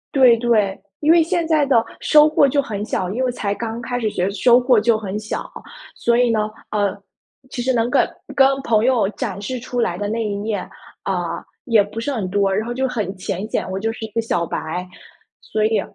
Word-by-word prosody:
对 255 -4 +6
对。 220 -5 +1 0.2
因 305 +1 +4
为 335 0 +6
现 335 +1 0
在 310 -3 +3
的 240 -4 +4 0.2
收 300 -1 +6
获 300 -2 +4
就 285 +2 +1
很 210 -7 -5
小， 185 -3 -2
因 245 +6 -1
为 255 - +1
才 205 -4 -2
刚 225 +2 -4
开 245 +1 -3
始 220 -3 0
觉 180 - -2
得 195 - 0
收 235 +5 +5
获 250 -2 +4
就 225 +1 +3
很 210 -1 -4
小。 215 0 -4 0.5
所 235 0 +1
以 245 -1 +3
呢， 215 -1 0 0.2
呃， 205 -2 0 0.5
其 245 - -4
实 260 +2 +1
能 235 0 +1
跟 - - +3 0.3
跟 270 -1 +6 0.2
朋 220 -2 +2
友 245 -6 +3
展 200 -2 -4
示 250 +5 -4
出 245 +1 -4
来 175 -7 0
的 205 - -2
那 225 +2 -2
一 205 - -2
面， 205 +1 -2 0.4
呃， - - -1 0.5
也 225 -6 +4
不 205 +3 -7
是 255 +5 -2
很 220 -8 -2
多， 200 0 +2
然 210 +3 0
后 240 - -3
就 265 +2 0
很 210 -6 -3
浅 195 +2 -4
显， - - -1
我 190 - -3
就 225 +3 -1
是 225 - -9
一 - - -9
个 230 - 0
小 175 -7 -1
白。 175 +4 -4 0.5
所 215 - -2
以， 220 -1 +2
225 Hz, 245 characters per minute, -20 LUFS, 205-245 Hz, 0.5 s, 对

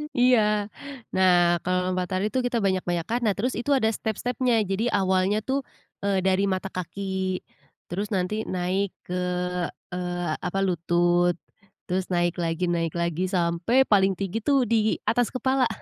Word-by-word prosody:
Iya, 250 -1 +5 0.8
nah, 175 -2 +4
kalau 180 0 +1
lompat 180 -1 -1
tali 185 +2 0
tuh 260 - 0
kita 245 -1 0
banyak-banyakan, 185 +3 0
nah 210 - +3
terus 250 +5 -1
itu 285 +4 -2
ada 220 -4 +2
step-stepnya. 230 +2 0
Jadi 200 +4 -1
awalnya 190 +1 +2
tuh, 265 +3 0 0.5
eee, 195 -1 +2
dari 190 +1 +2
mata 190 0 -2
kaki, 190 +1 -3 0.5
terus 200 +4 -2
nanti 210 +4 -1
naik 185 +2 -1
ke, 180 - -5 0.8
eee, 175 -2 -3 0.2
apa, 195 +2 -2
lutut, 175 0 +2 0.5
terus 185 +1 -1
naik 175 0 +1
lagi, 170 +1 -1
naik 165 -2 -1
lagi 170 +1 -1
sampai 180 +8 +2
paling 195 -2 +4
tinggi 195 +3 -3
tuh 275 -2 +3
di 220 -2 +2
atas 245 0 +2
kepala. 260 0 +2
190 Hz, 150 wpm, -25 LUFS, 175-220 Hz, 0.8 s, Iya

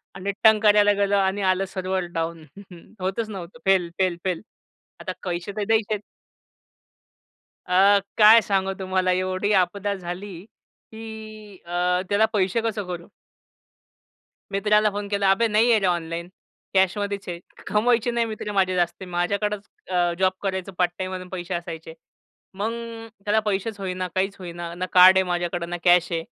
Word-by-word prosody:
आणि 195 +1 -3
टंग 220 -1 +7
करायला 205 -1 +5
गेलो 200 0 +1
आणि 195 0 +1
आलं 190 0 +2
सर्व्हर 185 -1 -3
डाउन. 165 -1 -3 0.6
होतंच 195 +4 -2
नव्हतं 190 +2 -8
फेल, 190 -3 +3
फेल, 185 -2 +1
फेल. 180 -3 -1 0.6
आता - - -4
पैसे 175 +1 -3
तर 210 - 0
द्यायचेत. 215 -1 +1 1.7
अ, 195 +3 +5 0.2
काय 220 +1 +8
सांगू 195 -2 0
तुम्हाला 185 -1 0
एवढी 185 +2 0
आपदा 200 +2 +1
झाली, 185 +1 -7 0.6
की 220 -2 -10
अ, 180 +1 0
त्याला 205 +2 +4
पैसे 195 +2 +1
कसे 220 -2 -2
करू? 175 -1 -6 1.4
मित्राला 210 +1 +3
फोन 205 0 -4
केला. 200 -1 +1
"अबे 230 +4 +3
नाही 220 +2 +3
आहे 225 - +5
रे 195 - -1
ऑनलाईन 170 -1 -2 0.5
कॅशमध्येच 200 +1 0
आहे." 170 -1 -5 0.3
कमवायचे 235 +2 +2
नाही 235 0 +1
मित्रे 215 -1 -5
माझे 190 -2 +1
जास्ती 175 +1 -1
माझ्याकडेच 200 +4 -1 0.3
अ, 175 -1 +2
जॉब 190 0 +3
करायचं 190 -1 -3
पार्ट 175 -1 +2
टाईममधून 185 -1 -5
पैसे 180 -1 -5
असायचे. 165 -2 -6 0.6
मग 205 +4 -2 0.5
त्याला 210 +1 +3
पैसेच 205 +1 -2
होईना 185 -1 -3
काहीच 195 +1 0
होईना 170 -2 -7
ना 180 +1 -3
कार्ड 185 +1 +8
आहे 190 - +4
माझ्याकडं 175 -1 -2
ना 175 - -3
कॅश 175 -1 +4
आहे 165 -1 -1
190 Hz, 150 wpm, -24 LUFS, 180-205 Hz, 1.7 s, काय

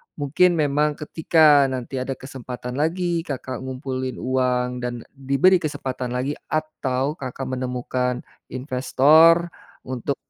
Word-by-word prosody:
mungkin 160 +5 +2
memang 150 -1 +1
ketika 150 -2 +4
nanti 130 0 -4
ada 130 +1 -3
kesempatan 125 -1 -7
lagi, 170 +2 0
Kakak 130 -2 -5
ngumpulin 130 0 -4
uang 125 -1 0
dan 120 -1 -4
diberi 140 +7 +3
kesempatan 130 -5 -4
lagi, 130 +3 -1 0.2
atau 150 -2 -2
Kakak 130 0 -5 0.2
menemukan 125 0 -2 0.2
investor 150 +6 +4 0.3
untuk 130 +2 -3
130 Hz, 110 wpm, -23 LUFS, 125-150 Hz, 0.3 s, ketika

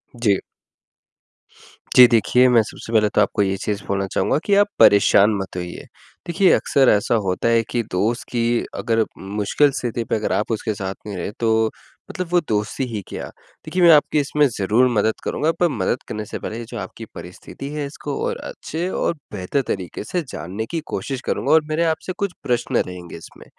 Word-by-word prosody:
जी। 105 -5 +2 1.6
जी 125 - +11
देखिए, 125 +2 +4
मैं 120 -2 +5
सबसे 115 +2 -9
पहले 105 -1 +4
तो 105 - +2
आपको 105 0 +1
ये 95 -1 +1
चीज़ 100 0 -3
बोलना 100 0 0
चाहूँगा 95 - +1
कि 200 - +3
आप 205 +1 +5
परेशान 100 +1 +6
मत 95 -1 -7
होइए, 90 0 -6 0.4
देखिए 180 +2 +3
अक़्सर 135 -2 +3
ऐसा 105 +3 +2
होता 90 +5 0
है 115 -1 +3
कि 120 -1 -1
दोस्त 110 +7 0
की 120 -2 0 0.3
अगर 115 -1 +1 0.3
मुश्किल 140 +8 +3
स्थिति 120 -1 -2
पे - - -1
अगर 110 - -2
आप 110 - -1
उसके 110 0 -1
साथ 95 -1 -5
नहीं 100 -3 -5
रहे 90 - -4
तो 110 -1 +2 0.4
मतलब 185 -1 -4
वो 180 - +5
दोस्ती 105 +4 -1
ही 110 -4 -4
क्या? - - -6 0.4
देखिए 180 - -1
मैं 170 - +8
आपकी 150 0 +4
इसमें 145 +1 +2
ज़रूर 115 +2 +2
मदद 110 -1 +1
करूँगा। 155 +2 0
पर 175 - +4
मदद 115 -1 -1
करने 110 0 -4
से - - -6
पहले 115 +2 -5
जो 120 +1 -8
आपकी 100 +3 -7
परिस्थिति 90 +9 -9
है 150 -1 -3
इसको 140 0 -6
और - - -2
अच्छे 170 +4 -5
और - - 0 0.2
बेहतर 100 +8 -1
तरीके 95 -1 -4
से 175 +11 -2
जानने 100 +6 -5
की 165 - -1
कोशिश 135 -2 -4
करूँगा - - -1
और 160 - +6
मेरे 155 +2 +1
आप 160 -1 +1
से 185 - -3
कुछ 200 -3 -2
प्रश्न 120 -1 0
रहेंगे 90 -2 -8
इसमें, 80 - -14
115 Hz, 195 wpm, -21 LUFS, 100-140 Hz, 1.6 s, जी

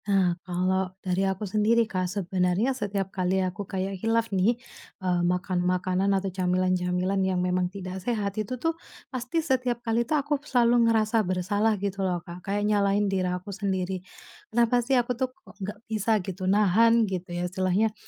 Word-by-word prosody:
Nah, 190 -3 +3
kalau 185 +1 0 0.2
dari 190 +1 +1
aku 190 +2 -3
sendiri 215 +3 +3
Kak, 185 -4 -2
sebenarnya 190 +5 0
setiap 200 -5 -3
kali 185 0 0
aku 185 +2 -5
kayak 190 -1 -3
khilaf 225 -1 +1
nih, 200 +6 +3 0.4
eee, 180 -2 0
makan 180 +1 0
makanan 185 +2 +1
atau 190 -1 -3
camilan-camilan 185 +1 +1
yang 190 -1 +1
memang 180 0 +1
tidak 190 -1 -6
sehat 205 -2 -1
itu 235 +5 -4
tuh, 325 +6 0 0.4
pasti 255 +6 -2
setiap 255 -4 +1
kali 225 +1 +2
tuh 270 +6 +1
aku 290 0 -1
selalu 240 -5 +3
ngerasa 220 0 +3
bersalah 205 +3 +1
gitu 195 0 -3
loh 185 -2 +1
Kak. 175 0 -9
Kayak 205 +2 -1
nyalahin 200 0 +2
diri 185 -1 +1
aku 180 +3 -4
sendiri. 190 -2 -2 0.5
Kenapa 235 +1 +3
sih 260 +2 +2
aku 245 0 +1
tuh 255 +1 -1
kok 190 - -17
nggak 205 +2 -5
bisa 220 0 +1
gitu 185 -1 -3
nahan 220 +3 +4
gitu 185 -2 -4
ya 175 - -1
istilahnya, 185 +4 +1
195 Hz, 175 wpm, -27 LUFS, 185-225 Hz, 0.5 s, nahan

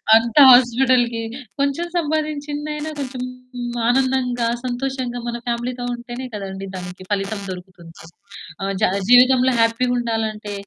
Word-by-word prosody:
అంతా 230 +5 +4
హాస్పిటల్‌కి. 245 -1 +4 0.4
కొంచెం 280 +5 0
సంపాదించిందైనా 300 -1 -2
కొంచెం 255 -2 -5 0.7
ఆనందంగా, 250 -1 +1 0.2
సంతోషంగా, 250 -1 -3
మన 235 0 -3
ఫ్యామిలీతో 245 +1 -3
ఉంటేనే 240 +1 -7
కదండి 195 -1 -6
దానికి 180 0 -8
ఫలితం 200 +1 -1
దొరుకుతుంది. 180 -3 -10 0.6
ఆ! - - -2 0.2
జ - - +1 0.3
జీవితంలో 255 +1 +6
హ్యాపీగా 230 +2 +2
ఉండాలంటే, 220 -3 -3
245 Hz, 105 wpm, -20 LUFS, 225-265 Hz, 0.7 s, జీవితంలో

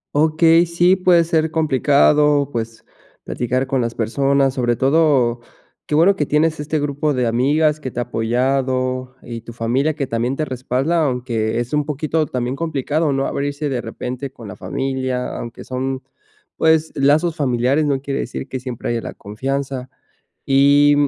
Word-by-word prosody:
Okey. 160 +3 +4
Sí, 175 +2 +3
puede 180 -2 +4
ser 160 -1 +1
complicado, 145 -1 +3
pues, 115 -2 -5 0.4
platicar 125 +2 -1
con 135 -1 0
las 115 -1 -3
personas. 135 +4 +1
Sobre 120 -2 0
todo, 135 -3 +2 0.5
qué 150 - 0
bueno 175 +6 +5
que 150 -6 -1
tienes 155 +1 +1
este 150 +1 -2
grupo 145 0 -1
de 125 -1 +1
amigas, 145 +6 +2
que 135 - -5
te 120 - -6
ha - - +1
apoyado, 130 +2 -1
y 115 -1 -7
tu 115 +1 -10
familia, 125 +7 0
que 140 - -2
también 120 +2 -1
te 155 - -2
respalda, 130 +5 -1
aunque 120 -4 -1
es 120 +2 -4
un 150 0 +2
poquito 155 +1 -1
también 125 0 -2
complicado, 155 0 -1
¿no?, 135 0 0
abrirse 145 +1 -2
de 130 -3 -2
repente 125 +3 -6
con 115 -4 -11
la 95 - -8
familia. 130 +4 -3
Aunque 120 -1 -7
son 130 +1 -3 0.5
pues, 160 0 +3
lazos 155 +4 +2
familiares, 135 0 +1
no 140 -2 +1
quiere 140 0 -3
decir - - -5
que 130 - -5
siempre 125 -2 -5
haya 120 -1 -1
la - - -7
confianza. 130 +4 -4 0.6
Y 140 +2 +5
135 Hz, 165 wpm, -19 LUFS, 125-150 Hz, 0.6 s, bueno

